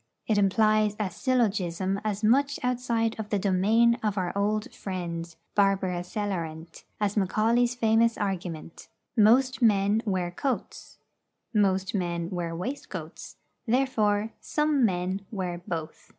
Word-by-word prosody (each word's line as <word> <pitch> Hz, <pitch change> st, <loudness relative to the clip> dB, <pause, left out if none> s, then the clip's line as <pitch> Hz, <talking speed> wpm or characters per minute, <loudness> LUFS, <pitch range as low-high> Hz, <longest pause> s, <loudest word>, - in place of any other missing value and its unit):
It 215 Hz, -2 st, +2 dB
implies 215 Hz, +1 st, +3 dB
a 200 Hz, -3 st, -1 dB
syllogism 195 Hz, -7 st, 0 dB
as 210 Hz, 0 st, -2 dB
much 275 Hz, +6 st, +3 dB
outside 240 Hz, -2 st, 0 dB
of 215 Hz, -1 st, -5 dB
the 210 Hz, -, +1 dB
domain 215 Hz, +5 st, +3 dB
of 210 Hz, -2 st, -1 dB
our 180 Hz, -1 st, -2 dB
old 210 Hz, +1 st, -1 dB
friend 170 Hz, -3 st, -5 dB, 0.2 s
'Barbara 195 Hz, -3 st, +2 dB
celarent' 175 Hz, -4 st, -5 dB
as 205 Hz, -1 st, 0 dB
Macaulay's 225 Hz, +5 st, +2 dB
famous 230 Hz, 0 st, +3 dB
argument: 180 Hz, -5 st, -4 dB, 0.3 s
Most 255 Hz, +4 st, +4 dB
men 205 Hz, -1 st, +3 dB
wear 185 Hz, -4 st, -1 dB
coats, 255 Hz, +8 st, -4 dB, 0.6 s
Most 190 Hz, -3 st, +2 dB
men 175 Hz, -2 st, -2 dB
wear 170 Hz, -2 st, -3 dB
waistcoats, 255 Hz, +12 st, -6 dB, 0.3 s
Therefore 220 Hz, -4 st, +1 dB
some 300 Hz, -3 st, +1 dB
men 185 Hz, 0 st, -1 dB
wear 180 Hz, -4 st, -4 dB
both. 160 Hz, -3 st, -5 dB
205 Hz, 120 wpm, -27 LUFS, 185-225 Hz, 0.6 s, Most